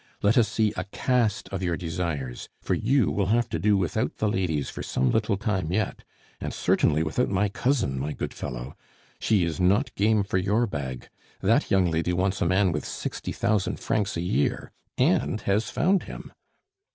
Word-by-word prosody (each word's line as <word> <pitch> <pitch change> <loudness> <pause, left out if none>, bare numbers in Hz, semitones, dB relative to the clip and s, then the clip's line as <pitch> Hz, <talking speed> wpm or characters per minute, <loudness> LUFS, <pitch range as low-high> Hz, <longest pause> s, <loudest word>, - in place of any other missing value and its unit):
Let 105 +2 +4
us 115 -3 +5
see 110 -2 +1
a 90 - -3
cast 115 +1 0
of 95 -1 -4
your 85 -3 0
desires, 80 -7 -4
for - - -1
you 130 +1 +2
will 100 -2 0
have 120 +3 +2
to 80 - -2
do 105 +3 +3
without 90 -5 -1
the 110 - 0
ladies 90 -8 0
for - - -6
some 65 - 0
little 110 -2 +1
time 95 -6 -1
yet, 110 +2 -1 0.4
and - - -4
certainly 75 +2 +2
without 80 +11 0
my 100 +1 +1
cousin, 115 - 0
my 75 +3 -2
good - - -4
fellow. 60 +2 -6 0.4
She 105 -5 +2
is 85 0 -3
not 100 +8 +2
game 105 0 +2
for 95 -1 0
your 105 +6 +2
bag; 70 - -5 0.3
that - - +2
young 95 -3 +3
lady 80 +2 0
wants 95 +1 0
a - - +2
man 95 +1 +3
with 75 -2 -2
sixty - - -5
thousand 105 -2 0
francs 105 -4 -1
a - - -1
year 70 -5 0 0.3
and 80 +10 +2
has 105 +3 0
found 190 +3 +2
him! - - -9
95 Hz, 190 wpm, -26 LUFS, 80-105 Hz, 0.4 s, us